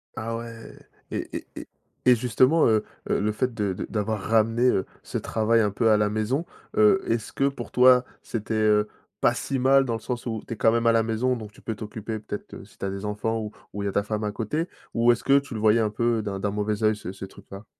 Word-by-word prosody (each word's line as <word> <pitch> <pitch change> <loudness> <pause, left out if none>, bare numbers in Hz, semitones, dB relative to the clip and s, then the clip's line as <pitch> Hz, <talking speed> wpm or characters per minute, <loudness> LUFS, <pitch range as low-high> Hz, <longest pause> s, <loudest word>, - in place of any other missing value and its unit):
Ah 115 +1 -3
ouais 115 -1 -9 0.4
et - - -4
et - - -10
et - - -8 0.4
et 125 -1 +7
justement, 130 +6 +3
heu 110 -1 +2 0.2
heu, - - +2
le 105 +1 +1
fait 125 +3 -1
de 100 -3 -1
de - - -5
d'avoir 105 -1 -2
ramené, 115 +3 +2
heu, 95 - +1 0.2
ce - - -4
travail 115 +1 +1
un 105 -2 +1
peu 115 +2 +2
à 105 - +5
la 105 0 +2
maison, 110 +10 -1 0.3
heu, 210 -3 +5
est-ce 115 -2 -2
que 140 0 +2
pour 120 -4 -8
toi, 125 0 +6 0.2
c'était, 110 -1 -4
heu, 105 -1 +3 0.3
pas - - +3
si 135 -2 -2
mal 135 +1 +5
dans 120 -3 -2
le - - -4
sens 120 +2 -5
où 110 -2 -3
tu - - -4
es - - -8
quand 110 +2 +4
même 115 0 +1
à - - +7
la 115 -1 +3
maison, 115 +3 0
donc 110 -2 -8
tu - - -19
peux 110 - -4
t'occuper 110 +1 -6
peut-être, 105 -1 -7
heu, - - -8
si 105 - -22
tu - - -4
as - - -1
des 95 +1 -5
enfants 105 +2 -2
ou 105 -1 -5 0.2
ou 100 0 -4
il - - -3
y - - +1
a - - -3
ta 100 - +1
femme 105 0 -3
à 105 - -1
côté, 150 - -2 0.3
ou 120 +1 +4
est-ce 120 - -1
que 140 0 +5
tu 140 -2 -9
le 110 - -4
voyais 110 +1 +4
un 105 - +1
peu 115 +1 0
d'un 100 -2 -4
d'un 100 0 -1
mauvais 105 +1 -2
œil 110 0 +4
ce 95 -3 -7
ce 95 0 -8
truc-là? 100 +1 -12
110 Hz, 265 wpm, -25 LUFS, 105-120 Hz, 0.4 s, et